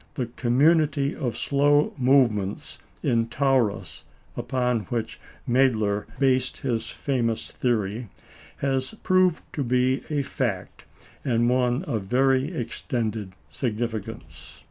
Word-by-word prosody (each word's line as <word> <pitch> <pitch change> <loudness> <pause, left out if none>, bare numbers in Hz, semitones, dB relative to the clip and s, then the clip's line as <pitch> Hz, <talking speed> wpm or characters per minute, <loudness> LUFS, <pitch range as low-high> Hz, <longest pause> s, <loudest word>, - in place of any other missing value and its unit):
The 130 -5 -1
community 140 +4 +2
of 120 -3 -3
slow 145 +1 +3
movement 125 -7 +2 0.2
in 115 -1 +2
Taurus, 130 -4 0 0.3
upon 125 -2 0
which 115 -3 -4 0.3
Mädler 110 -5 +2
based 130 -2 +2
his 120 -4 -2
famous 120 -5 -2
theory, 110 -2 -1 0.5
has 135 +5 -1
proved 185 -3 +3
to 145 - -1
be 125 +2 +2
a 145 -2 0
fact, 115 -8 -3 0.4
and 120 -3 +2
one 125 +3 +1
of 120 - -2
very 130 - +2
extended 110 - -3
significance. 110 - -5
125 Hz, 105 wpm, -25 LUFS, 115-135 Hz, 0.5 s, slow